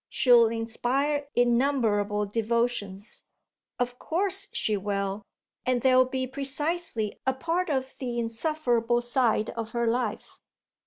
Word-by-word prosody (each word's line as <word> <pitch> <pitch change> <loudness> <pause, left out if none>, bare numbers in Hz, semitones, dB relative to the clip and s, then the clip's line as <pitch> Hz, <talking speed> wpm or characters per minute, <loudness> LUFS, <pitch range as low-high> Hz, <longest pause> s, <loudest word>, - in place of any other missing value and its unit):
She'll 240 -3 +5
inspire 250 +6 -1
innumerable 235 -5 +2
devotions." 220 -2 -2 0.5
"Of 245 0 -2
course 390 +3 -1
she 215 - 0
will, 200 0 -2 0.4
and 255 -1 +1
they'll 255 -1 +5
be 260 0 -2
precisely 280 -3 -1
a 265 - +3
part 335 +6 -1
of 265 -2 -2
the 245 -2 -3
insufferable 240 -1 0
side 240 -3 +1
of 225 -1 -6
her 235 0 0
life." 230 -2 -2
240 Hz, 115 wpm, -27 LUFS, 225-270 Hz, 0.5 s, She'll